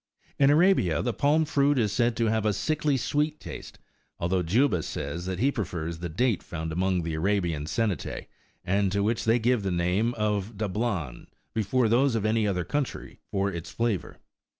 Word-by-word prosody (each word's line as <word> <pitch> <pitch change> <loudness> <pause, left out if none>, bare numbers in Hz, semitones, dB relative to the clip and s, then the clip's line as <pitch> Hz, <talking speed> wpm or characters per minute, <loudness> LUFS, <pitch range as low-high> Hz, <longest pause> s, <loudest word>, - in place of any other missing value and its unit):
In 140 -1 +6
Arabia, 150 - +3
the 120 - 0
palm 150 +4 +2
fruit 145 -1 +2
is 110 -5 +2
said 120 0 +1
to 115 - +2
have 110 -1 +1
a 105 -1 +2
sickly 150 - 0
sweet 150 +4 -1
taste, - - -9 0.4
although 90 +2 0
Juba 95 - +2
says 80 +5 -5
that 95 -1 -2
he 135 +8 +2
prefers 85 - -4
the 85 0 -4
date 115 +6 +1
found 80 -1 -5
among 90 +1 0
the 80 -1 -3
Arabian 85 -3 0
Sceriitse,20 105 -4 -2 0.4
and 100 +1 +1
to 100 +1 +1
which 110 +2 0
they 115 +2 +4
give 120 0 +2
the 100 - -2
name 90 +7 +1
of 105 -1 -1
"dablan," 100 - -2 0.3
before 115 +3 +1
those 120 +3 +3
of 110 -2 -1
any 110 0 +2
other 90 -3 0
country 145 +4 -4
for 100 0 0
flavour. 115 +2 -2
105 Hz, 175 wpm, -27 LUFS, 90-120 Hz, 0.4 s, In